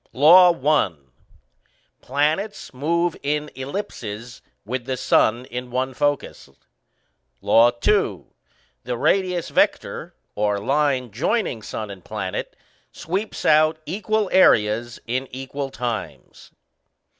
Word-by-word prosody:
LAW 175 +6 +8 0.2
I. 150 - +3 1.1
Planets 155 +11 -1
move 170 +6 0
in 150 +1 -2
ellipses, 125 - -6 0.2
with 120 +2 -4
the 130 -1 -3
Sun 120 +1 +2
in 125 0 -6
one 130 +1 -2
focus. 145 - -2 0.9
LAW 110 +4 +5
II. 120 - +1 0.6
_The 120 0 -4
radius 180 -3 +1
vector - - 0 0.2
(or 105 -1 0
line 135 +1 0
joining 150 - -1
sun 105 0 -6
and 95 -3 -11
planet) - - -5 0.4
sweeps 195 +6 -4
out 155 +1 +4
equal 215 +4 -1
areas 115 - +3
in 130 +3 -2
equal 135 +2 -5
times. 120 -4 -6
130 Hz, 105 wpm, -22 LUFS, 120-160 Hz, 1.1 s, LAW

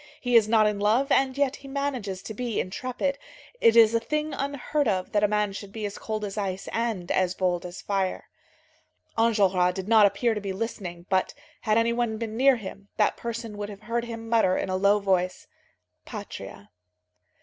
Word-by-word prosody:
He 245 -1 0
is 220 -2 +6
not 220 -1 +5
in 210 -1 0
love, 225 +7 +2
and 265 0 +3
yet 280 -1 +1
he 275 - -13
manages 260 -9 -3
to 220 - -6
be 235 0 -2
intrepid. 255 +8 -2 0.4
It 230 - +5
is 225 -1 +7
a 230 - +3
thing 300 +5 -2
unheard 280 +1 -1
of 185 -3 -1
that 205 0 +2
a - - +6
man 210 -1 0
should 200 0 -8
be 215 0 -5
as 205 - -5
cold 215 -1 -3
as 205 +1 -4
ice 195 -1 -3
and 225 -6 -2
as 185 0 +1
bold 180 -1 0
as 175 - -9
fire." 195 -2 -1 0.9
Enjolras 195 -6 +3
did 190 0 -5
not 220 -2 +7
appear 200 +4 0
to 210 - -4
be 195 -1 -3
listening, 190 -5 -5
but 185 -1 +1 0.2
had 215 0 +1
any 230 +1 +3
one 235 -2 -1
been 220 -1 -4
near 265 +2 +5
him, 200 -2 -9
that 210 - +3
person 230 -2 -5
would 205 0 -4
have 205 0 -10
heard 235 +2 -2
him 225 -1 -7
mutter 225 -5 +3
in - - -2
a 185 - 0
low 200 +2 +4
voice: 185 -2 0 0.6
"Patria." 100 - -9
215 Hz, 200 wpm, -26 LUFS, 195-235 Hz, 0.9 s, is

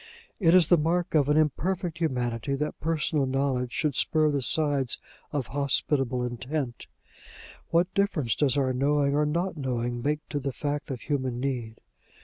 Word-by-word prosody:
It 170 -3 +5
is 180 -4 +6
the 175 - +6
mark 170 +3 0
of 145 -3 +3
an 150 - +4
imperfect 165 +3 0
humanity, 125 -4 -1
that 150 +2 -3
personal 155 -3 0
knowledge 130 -2 0
should 150 +2 0
spur 155 +3 +2
the 140 -1 0
sides 140 -2 +1 0.3
of 145 -4 -1
hospitable 135 -2 +1
intent: 125 +1 -4 0.8
what 175 +2 +2
difference 180 - +1
does 145 -2 +2
our 130 -2 +1
knowing 140 +2 +2
or 150 +1 +2
not 170 +3 -1
knowing 120 -3 -2
make 150 +4 -2
to 145 - -2
the 135 0 -3
fact 145 +1 -3
of 130 -3 -5
human 130 -4 -2
need? 125 -4 -3
145 Hz, 160 wpm, -27 LUFS, 130-155 Hz, 0.8 s, is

